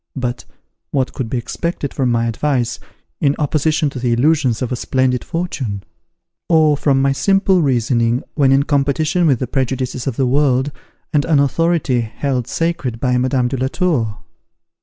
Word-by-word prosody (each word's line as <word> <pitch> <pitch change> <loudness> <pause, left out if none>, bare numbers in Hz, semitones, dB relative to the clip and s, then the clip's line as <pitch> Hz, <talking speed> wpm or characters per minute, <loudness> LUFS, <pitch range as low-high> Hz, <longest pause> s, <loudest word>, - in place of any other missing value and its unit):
But 125 -2 -3 0.4
what 130 -2 -1
could 125 -5 -4
be 130 - -1
expected 145 +4 -3
from 130 -2 0
my 115 0 +1
advice, 120 0 -1 0.4
in 140 -1 +2
opposition 155 +1 +1
to 130 - -6
the 120 -1 0
illusions 130 -2 +2
of 125 - -3
a - - 0
splendid 130 0 0
fortune? 135 - -4 0.7
or 155 -3 +4
from 140 -1 +2
my 135 - +3
simple 195 +4 +2
reasoning, 120 -3 +1
when 140 -3 +3
in 135 +1 +4
competition 155 +4 +1
with 135 -4 +3
the 130 - -2
prejudices 130 0 -2
of 130 - -1
the 135 - +1
world, 135 +1 +2 0.4
and 145 -2 +3
an 155 -3 +3
authority 140 -2 +1
held 125 +2 -3
sacred 155 -9 -2
by 125 0 +1
Madame 130 -1 +1
de 130 - -3
la 130 +1 0
Tour? 130 - -1
135 Hz, 165 wpm, -18 LUFS, 125-150 Hz, 0.7 s, or